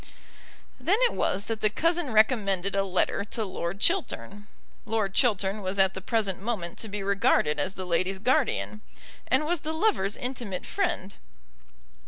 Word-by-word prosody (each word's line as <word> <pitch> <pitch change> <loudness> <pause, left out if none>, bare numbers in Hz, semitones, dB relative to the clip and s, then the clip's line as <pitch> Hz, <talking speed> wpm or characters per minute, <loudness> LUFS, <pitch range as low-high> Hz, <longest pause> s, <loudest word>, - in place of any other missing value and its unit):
Then 390 +5 +2
it 485 - +4
was 195 - 0
that 225 0 -4
the 215 - +4
cousin 330 +4 0
recommended 200 -4 +2
a 195 - +2
letter 195 +1 0
to 220 +1 -3
Lord 185 0 -4
Chiltern. 215 - -1 0.4
Lord 215 -3 -1
Chiltern 205 -4 +1
was 190 +1 -2
at 190 -1 +4
the 190 - -6
present 200 -3 0
moment 200 -6 -3
to 225 - -3
be 205 -1 -4
regarded 195 -6 +2
as 190 - -1
the 185 - -5
lady's 185 +2 0
guardian, 245 -2 0 0.5
and 305 - +2
was 345 +1 0
the 310 +2 -4
lover's 320 - +1
intimate 240 -7 -4
friend. 345 - -2
205 Hz, 160 wpm, -27 LUFS, 190-250 Hz, 0.5 s, it